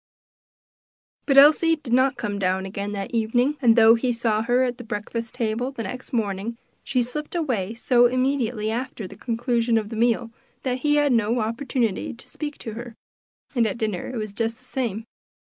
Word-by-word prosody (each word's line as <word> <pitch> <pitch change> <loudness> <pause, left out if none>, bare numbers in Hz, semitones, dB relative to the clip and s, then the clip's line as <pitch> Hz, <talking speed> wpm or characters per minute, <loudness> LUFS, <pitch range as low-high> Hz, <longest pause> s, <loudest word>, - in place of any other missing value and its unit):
But 275 -2 +3
Elsie 310 +4 +7
did 280 -6 -5
not 260 +2 +3
come 205 -2 -3
down 190 0 0
again 200 +1 -4
that 195 -1 -4
evening, 245 +5 +1
and 235 -3 +5
though 225 -1 +7
he 245 +2 +1
saw 230 -2 0
her 245 +3 +2
at 245 -1 -2
the - - -7
breakfast 225 +2 -5
table 240 +2 -1
the 235 -4 -5
next 250 +1 -7
morning, 220 0 -2 0.3
she 255 -3 +1
slipped 300 +7 -5
away 230 - -1
so 245 +1 +4
immediately 250 -4 0
after 240 -3 -4
the 195 - -12
conclusion 235 +1 0
of 215 -2 -2
the 225 - -6
meal, 230 0 +1 0.3
that 255 -1 -1
he 295 +2 +2
had 290 -1 +3
no 230 +1 +2
opportunity 230 -1 -1
to 235 - -13
speak 295 -1 -6
to 225 - -7
her; 235 0 -8 0.6
and 235 -4 +2
at 210 - -3
dinner 215 -6 -2
it 255 - -5
was 215 -2 -4
just 225 +1 -2
the 255 - -24
same. 230 -5 -3
235 Hz, 190 wpm, -24 LUFS, 220-255 Hz, 0.6 s, Elsie